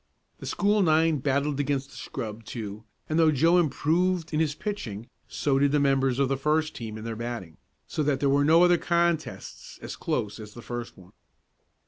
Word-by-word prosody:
The - - -7
school 205 +1 +2
nine 160 -2 +3
battled 140 +1 0
against 140 -1 -1
the - - -14
scrub, 115 -3 -6
too, 110 -1 -7 0.2
and 155 +1 0
though 160 -1 +5
Joe 165 +5 +4
improved 165 +3 0
in 155 - +1
his 155 -2 +1
pitching 120 - -5 0.2
so 135 -2 0
did 140 0 +3
the 150 - +3
members 135 -2 +2
of 140 -1 +2
the 135 +1 -1
first 155 +3 0
team 110 -3 -6
in 110 - -8
their 115 0 -4
batting, 115 -8 -6 0.3
so 160 - -3
that 140 -2 +1
there 140 - +1
were 140 +1 +3
no 165 +4 +6
other 175 -1 +5
contests 170 -2 -1
as - - -7
close 105 +1 -3
as 105 -1 -10
the 120 - -10
first 120 -1 -6
one. 90 0 -17
140 Hz, 195 wpm, -27 LUFS, 120-160 Hz, 0.3 s, no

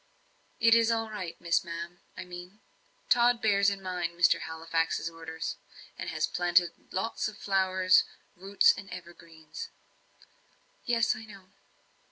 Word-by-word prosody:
"It 230 0 +6
is 230 0 +5
all 225 -1 0
right 185 -6 -6
Miss 170 -1 +1
Ma'am, 170 +1 -7 0.2
I - - -6
mean. 180 +3 -10 0.5
Tod 240 0 +4
bears 200 -2 +3
in 195 -1 -5
mind 175 -2 -3
Mr. 175 -1 +4
Halifax's 165 +1 -2
orders, 165 0 -6 0.4
and - - -5
has 155 -2 0
planted 175 -1 +2 0.2
lots 215 +3 -2
o' - - -11
flower 190 -2 0 0.5
roots 195 +3 +4
and 195 -1 -9
evergreens." 170 -3 -10 1.2
"Yes, 230 -2 +2
I 225 - -9
know." 195 -3 -14
185 Hz, 135 wpm, -29 LUFS, 170-205 Hz, 1.2 s, It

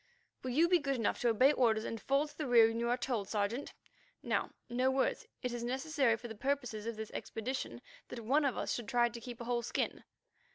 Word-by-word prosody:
"Will 255 - -4
you 310 +7 +4
be 355 0 +4
good 275 -2 -1
enough 230 -4 0
to 240 - +3
obey 255 +5 +5
orders 225 -5 +2
and 225 - -4
fall 275 +3 +2
to 295 - -15
the 300 -2 -3
rear 235 -2 +7
when 225 0 -2
you 235 0 0
are 245 - +2
told, 235 -6 -2
Sergeant? 215 +5 -2 0.5
Now, - - 0 0.2
no 255 +2 +1
words. 270 - 0 0.2
It 250 -1 -1
is 240 -1 -3
necessary 265 0 +1
for 240 - -8
the 225 - -6
purposes 245 -3 -2
of 230 - -3
this 220 0 -6
expedition 255 +4 -4 0.2
that 245 - -7
one 275 +7 +2
of 275 -3 +1
us - - -2
two - - -3
should 225 - -10
try 240 -2 +3
to 235 0 -9
keep 240 0 -8
a - - -5
whole 240 0 0
skin." 235 - -2
245 Hz, 240 wpm, -34 LUFS, 230-270 Hz, 0.5 s, rear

